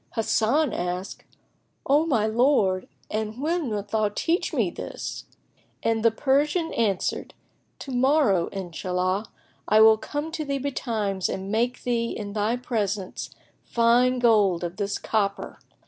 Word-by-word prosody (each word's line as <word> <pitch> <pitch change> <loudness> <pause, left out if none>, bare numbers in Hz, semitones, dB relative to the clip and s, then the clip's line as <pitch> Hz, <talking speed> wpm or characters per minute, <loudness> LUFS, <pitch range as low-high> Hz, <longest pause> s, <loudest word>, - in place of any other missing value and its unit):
Hasan 235 +5 +2
asked, 180 +2 -4 0.6
"O 295 +4 +3
my 230 -9 +2
lord 220 -5 +2 0.2
and 215 +2 -3
when 320 -1 -1
wilt 205 -1 -4
thou 215 -1 +1
teach 330 - -1
me - - 0
this?"; - - -6 0.6
and 225 -1 +1
the 230 - +6
Persian 295 +7 +1
answered, 205 -5 -1 0.5
"To 275 - -7
morrow, 250 - +3
Inshallah, 185 +2 -2 0.4
I 215 - +5
will 220 0 +7
come 295 +6 -4
to 320 -1 -3
thee 280 -1 -2
betimes 220 -8 -2
and 190 +1 -4
make 240 +3 0
thee 235 -1 0
in 205 -1 -6
thy 215 +2 0
presence 210 -6 -3 0.3
fine 240 +2 +3
gold 210 -8 +3
of 175 +1 -4
this 200 -1 -1
copper." 200 -3 -2
220 Hz, 135 wpm, -25 LUFS, 200-260 Hz, 0.6 s, will